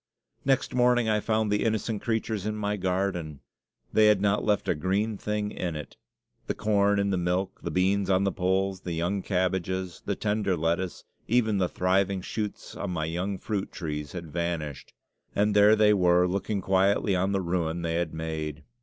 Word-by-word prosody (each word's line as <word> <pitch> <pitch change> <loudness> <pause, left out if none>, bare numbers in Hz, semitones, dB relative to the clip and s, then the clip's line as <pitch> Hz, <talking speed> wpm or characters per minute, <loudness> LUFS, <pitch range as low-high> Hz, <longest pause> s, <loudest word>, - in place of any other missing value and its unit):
Next 135 -1 +1
morning 125 -1 +3
I 105 -1 +2
found 110 0 0
the 105 - +1
innocent 110 -1 -1
creatures 110 -3 -1
in 110 - -2
my 105 -1 -1
garden. 90 -6 -2 0.5
They 110 0 +6
had 105 -2 +5
not 100 +1 +1
left 105 -2 +1
a - - +3
green 95 +7 0
thing 105 0 -2
in 85 -3 -3
it. 75 - -7 0.5
The - - -1
corn 100 -1 +2
in 100 0 +1
the 95 - +1
milk, 90 +2 -1
the - - -3
beans 95 +2 +1
on 95 0 +3
the 100 - +1
poles, 95 +1 0
the 90 - -4
young 90 +4 -1
cabbages, 95 -1 -1
the - - -2
tender 105 -3 0
lettuce, 85 +3 -1 0.2
even 110 -4 +2
the 90 -2 +1
thriving 95 +1 +1
shoots 105 +2 -5
on 100 - -4
my 80 -3 -1
young 90 +5 -2
fruit 100 0 -3
trees 75 -3 -5
had 85 -4 -7
vanished. 85 -3 -3 0.4
And 105 0 +2
there 105 +1 +7
they 105 -1 +5
were, 90 -2 +4
looking 100 +2 -2
quietly 95 +1 +2
on 95 +2 +1
the 100 - +1
ruin 85 -1 -1
they 85 0 -1
had 85 -1 -1
made. 80 -1 -4
95 Hz, 185 wpm, -27 LUFS, 90-105 Hz, 0.5 s, there